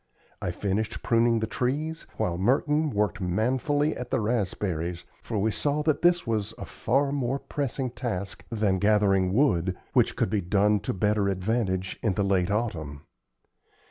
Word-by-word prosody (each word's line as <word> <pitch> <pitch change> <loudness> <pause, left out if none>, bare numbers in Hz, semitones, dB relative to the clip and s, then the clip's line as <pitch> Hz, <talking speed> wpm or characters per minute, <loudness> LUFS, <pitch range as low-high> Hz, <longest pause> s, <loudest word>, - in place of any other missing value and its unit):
I - - -1
finished 105 +5 -2
pruning 115 -1 +3
the - - +1
trees, 145 +8 -2
while 85 - 0
Merton 150 +8 +2
worked 105 -2 -1
manfully 130 - +1
at 125 0 -6
the - - +1
raspberries, 95 -6 -2 0.2
for 115 - -4
we 110 +2 +1
saw 145 +6 0
that 155 -1 +1
this 175 0 +3
was 110 -1 -2
a - - -6
far 135 +4 0
more 135 -2 -1
pressing 135 -3 -3
task 100 -8 -4
than 105 -4 +1
gathering 100 -3 +3
wood, 95 - +2 0.2
which - - +3
could - - 0
be 105 - +1
done 100 +3 +2
to 100 - -3
better 105 +1 +1
advantage 95 -1 -1
in 105 -5 0
the 100 - +1
late 95 -2 +2
autumn. 85 -10 -2
105 Hz, 160 wpm, -27 LUFS, 95-125 Hz, 0.2 s, pruning